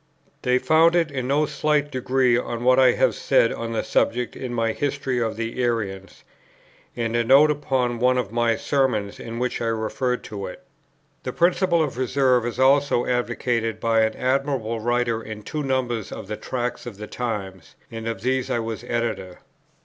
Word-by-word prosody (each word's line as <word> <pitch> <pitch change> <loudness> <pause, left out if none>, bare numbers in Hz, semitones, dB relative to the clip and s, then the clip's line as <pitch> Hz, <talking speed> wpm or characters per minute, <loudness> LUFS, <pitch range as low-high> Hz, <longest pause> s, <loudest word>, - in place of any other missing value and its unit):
They 125 0 +2
found 160 +5 +4
it 165 -3 +2
in 130 -3 -3
no 145 +3 +2
slight 150 0 0
degree 130 -1 +2
on 120 -1 -2
what 130 +1 +5
I 130 -2 +6
have - - +2
said 115 - +2
on 115 0 -5
the 115 - -1
subject 120 +2 0
in 130 -2 -5
my 115 -2 0
History 140 -2 -2
of 110 -1 -1
the 115 +2 -3
Arians, 100 -6 -3 0.7
and 115 -1 -2
in 120 - +3
a - - 0
note 140 +5 +6
upon 130 -5 -1
one 125 +1 +3
of 115 -5 -2
my 115 -1 +2
Sermons 120 -9 0
in 115 0 -6
which 125 0 -2
I 115 - -1
refer 115 +3 -1
to 100 -5 -7
it. 90 - -10 0.6
The 125 - -4
principle 175 -1 +2
of 135 -4 -4
Reserve 130 -2 +2
is 120 - -5
also 135 -1 +3
advocated 115 -2 -1
by 115 0 +2
an 110 0 +1
admirable 130 -3 -1
writer 120 0 0
in 110 -1 -8
two 150 +8 -4
numbers 130 -5 -1
of - - -7
the 105 - -3
Tracts 125 +1 -4
for - - -4
the 105 -1 -9
Times, 100 -8 -5 0.2
and 115 0 -6
of 115 - -4
these 130 +1 0
I - - 0
was 115 -1 -4
the - - -13
Editor. 115 -6 -3
120 Hz, 190 wpm, -23 LUFS, 115-130 Hz, 0.7 s, I